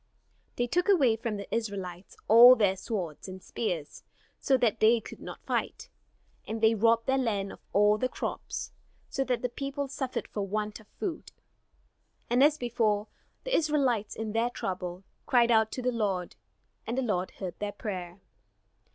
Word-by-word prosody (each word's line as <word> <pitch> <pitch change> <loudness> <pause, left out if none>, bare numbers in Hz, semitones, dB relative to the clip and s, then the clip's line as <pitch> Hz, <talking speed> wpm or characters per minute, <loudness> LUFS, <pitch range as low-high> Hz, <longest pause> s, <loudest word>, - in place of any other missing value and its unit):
They 245 - 0
took 350 - 0
away 275 - +5
from 225 -1 -3
the 200 - -7
Israelites 195 -5 -4
all 240 +3 +10
their 200 -5 +2
swords 185 -5 -5
and 185 0 -8
spears, 175 -7 -4 0.4
so 265 - +3
that 230 -3 +1
they 225 +2 +5
could 215 - -11
not - - -9
fight; - - -2 0.6
and 220 +1 -3
they 220 0 +5
robbed 230 +1 +3
their 265 0 +2
land 205 -6 -1
of - - -11
all 210 +1 +4
the 255 - 0
crops, - - -5 0.4
so 270 - -1
that 250 -2 -1
the - - +2
people 275 +3 -4
suffered 265 -1 -4
for 205 - -4
want 210 +2 -3
of 215 - -18
food. 340 - -5 1.0
And 250 +2 +5
as 300 +1 +5
before, 225 -5 0 0.3
the - - 0
Israelites 270 -9 +1
in 220 -1 -4
their 230 +2 +1
trouble, 180 -4 -5 0.2
cried 240 -1 +4
out 220 -1 +4
to 255 - -4
the 250 - +1
Lord, 195 -6 -2 0.5
and 235 +3 -2
the 265 - +1
Lord 185 -6 -1
heard 185 -3 -6
their 205 0 -2
prayer. 185 -3 -6
225 Hz, 170 wpm, -29 LUFS, 200-250 Hz, 1.0 s, all